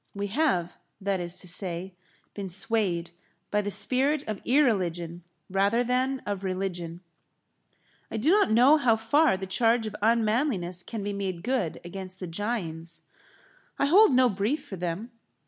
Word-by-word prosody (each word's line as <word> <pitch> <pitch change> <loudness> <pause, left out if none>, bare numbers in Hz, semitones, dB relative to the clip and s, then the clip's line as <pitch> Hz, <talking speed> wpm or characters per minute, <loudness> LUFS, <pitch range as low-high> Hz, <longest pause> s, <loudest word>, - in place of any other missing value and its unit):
We 200 0 -2
have, 205 - 0 0.2
that 195 -1 -1
is 175 0 -3
to 185 - -7
say, 180 +1 -3 0.4
been 200 -2 -5
swayed 190 -3 0 0.4
by 210 - +2
the 205 - -3
spirit 270 +7 +3
of 215 -2 -4
irreligion 180 - +1 0.2
rather 200 +5 +2
than 255 +2 0
of 200 -2 -3
religion. 180 -3 -4 1.1
I - - -4
do 265 +10 +3
not 410 - +4
know 250 +7 +6
how 245 -6 +3
far 225 +2 +2
the 190 - -5
charge 225 +4 +2
of 215 - -5
unmanliness 220 - +1
can 215 +3 -6
be 205 0 -3
made 190 -4 -4
good 240 -9 -1
against 185 +1 -8
the 185 - -5
Jains. 170 -3 -4 0.7
I - - +2
hold 380 +6 +6
no 255 0 +5
brief 235 +8 -1
for 205 - -7
them. 180 +6 -4
205 Hz, 155 wpm, -27 LUFS, 180-245 Hz, 1.1 s, know